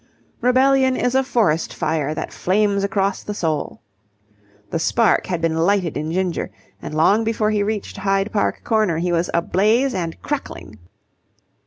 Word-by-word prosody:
Rebellion 260 +1 +3
is 245 - 0
a 265 0 +3
forest 215 - 0
fire 155 -1 -1
that - - -5
flames 200 +1 +1
across 195 0 0
the 210 - -6
soul. 160 -6 -2 0.9
The 165 - -1
spark 210 +5 +2
had 175 -3 -2
been 165 -1 +1
lighted 175 0 +1
in 155 +2 -3
Ginger, 185 0 -1 0.3
and 155 - -6
long 195 +8 +3
before 220 -1 0
he 210 -1 +1
reached 210 0 -3
Hyde 195 +1 0
Park 205 - 0
Corner 215 -7 +1
he 175 +2 -1
was 170 0 0
ablaze 215 +10 +2
and 170 -4 -4
crackling. 190 - -5
195 Hz, 155 wpm, -20 LUFS, 165-220 Hz, 0.9 s, Rebellion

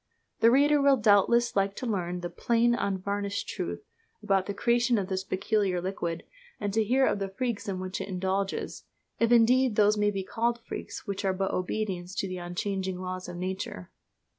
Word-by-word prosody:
The 230 - +6
reader 290 +3 +4
will 275 -1 +5
doubtless 220 +2 +4
like 195 0 +1
to - - -5
learn 180 -5 -2
the 175 - -4
"plain, 235 0 +2
unvarnished 200 -1 -2
truth" - - -4 0.4
about 195 -2 +1
the 200 - -2
creation 240 +2 +2
of 195 -2 -2
this 190 0 -1
peculiar 190 -1 0
liquid, 175 -2 -3 0.4
and 205 -1 -2
to 220 +1 +3
hear 260 +5 +3
of 205 - +1
the 195 -1 -2
freaks 235 +2 -3
in 185 -1 -3
which 185 0 -4
it - - -5
indulges 190 +1 -2 0.3
if 230 0 +2
indeed 240 +1 +5
those 210 0 +4
may 210 0 +3
be 195 -2 -3
called 235 +4 -1
freaks - - -7
which 200 -1 -4
are 190 -1 +1
but 195 +1 -1
obedience 185 -1 -3
to 195 - -1
the 185 -1 -5
unchanging 185 +1 -3
laws 185 0 -5
of 175 - -7
Nature. 185 - -5
200 Hz, 190 wpm, -28 LUFS, 185-230 Hz, 0.4 s, The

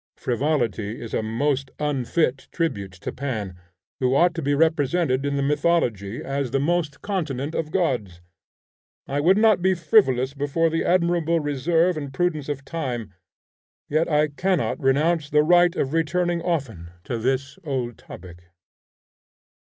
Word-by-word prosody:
Frivolity 120 -5 -1
is 115 - -8
a - - +1
most 135 +5 -1
unfit 140 -1 -1
tribute 100 - -2
to 95 - -6
Pan, 110 -9 -4 0.4
who 130 0 +2
ought 175 +3 +4
to 165 - -4
be 145 -1 +1
represented 155 -2 +1
in 140 - -1
the 140 - 0
mythology 140 - 0
as 135 -1 -2
the 135 - 0
most 160 0 -1
continent 155 -8 -3
of 155 -2 -2
gods. 125 - -1 0.9
I 140 +1 -2
would 180 +7 +4
not 215 -4 +4
be 190 +1 +3
frivolous 140 - +3
before 145 +4 0
the 165 - 0
admirable 170 -2 +2
reserve 160 +4 +1
and 140 -3 -5
prudence 155 -1 -1
of 140 -2 -4
time, 125 -11 -4 0.8
yet 155 +3 +1
I 150 0 +2
cannot 185 +6 -1
renounce 150 +3 +1
the 150 0 +4
right 175 +2 +4
of 140 -3 -1
returning 170 +1 0
often 135 - -3
to 120 -3 -3
this 135 +3 -2
old 130 -6 -3
topic. 85 -2 -12
145 Hz, 145 wpm, -23 LUFS, 130-165 Hz, 0.9 s, ought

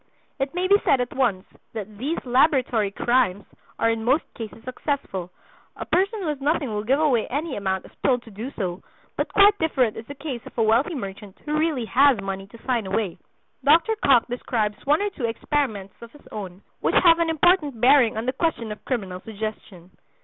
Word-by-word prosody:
It 270 +4 -2
may 365 +1 0
be 400 +1 +6
said 270 - +3
at 245 0 -2
once 225 -9 +1 0.3
that 210 -1 -7
"these 295 +7 -2
laboratory 250 -4 +2
crimes" 205 -2 +1 0.3
are 230 - +2
in 225 -1 -3
most 265 +7 +2
cases 225 0 -9
successful: 250 - -4 0.5
A - - -6
person 395 +3 0
who - - -3
has 290 -2 -3
nothing 290 -1 0
will 210 0 -2
give 265 +6 +2
away 270 -8 +2
any 290 +2 -3
amount 190 -2 -2
if - - -15
told 250 -3 +2
to 225 - -14
do 220 +6 -6
so; 185 -3 -3 0.3
but - - -2
quite 405 0 +5
different 265 -8 +1
is 225 - -7
the 285 - -8
case 275 -4 -6
of - - -14
a 230 - +3
wealthy 235 +10 +2
merchant 200 -4 -7
who 300 0 -1
really 305 -6 0
has 270 0 +4
money 195 0 -5
to 230 +3 -16
sign 240 -6 0
away. 195 -2 -2 0.4
Dr. 335 +10 +4
Cocke 250 -4 +5
describes 225 -3 -2
one 300 +7 +3
or 410 - -1
two 275 -10 -4
experiments 225 -5 -2
of 235 -1 -11
his 295 - -18
own 195 -3 -7 0.2
which - - 0
have 335 -1 +6
an 335 -1 +1
important 320 -5 +2
bearing 250 -2 +5
on 220 - -2
the 255 - 0
question 255 -10 -1
of 210 - -8
criminal 195 -8 -3
suggestion. 205 -4 -7
245 Hz, 200 wpm, -24 LUFS, 210-290 Hz, 0.5 s, be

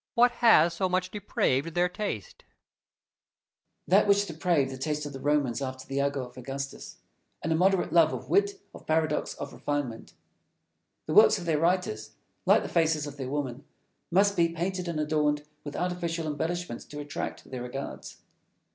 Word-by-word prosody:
What 245 +1 +6
has 170 -8 +6
so 185 +2 0
much 185 0 0
depraved 165 -6 0
their 175 +1 +3
taste? 180 - -5
Fenelon. - - -37
That - - -2
which 200 0 +4
depraved 160 -5 0
the 130 - -6
taste 150 +2 -2
of 145 - -6
the 135 - -7
Romans 145 -3 +1
after 130 -1 -5
the 135 0 -3
ago 140 -1 0
of 125 - -15
Augustus 135 +2 -6 0.5
an 165 - -1
immoderate 185 +3 +2
love 165 -2 +6
of - - -6
wit, 405 0 +2
of - - -13
paradox, 155 -1 0
of - - -7
refinement. 140 -6 -3 0.9
The - - -3
works - - +7
of - - -7
their 160 -3 +1
writers, 170 -11 0 0.3
like - - +5
the - - -4
faces 160 -3 +1
of 145 -1 -8
their 130 -2 -4
women, 140 -2 -3 0.5
must 200 +3 +3
be 170 -2 +3
painted 180 +2 -3
and 165 -2 -2
adorned 150 -1 +1 0.2
with 145 - -7
artificial 175 -2 -2
embellishments 160 -1 -3
to 150 - -9
attract 145 -2 -6
their 130 -2 -4
regards. 130 +3 -7
155 Hz, 170 wpm, -28 LUFS, 140-180 Hz, 0.9 s, works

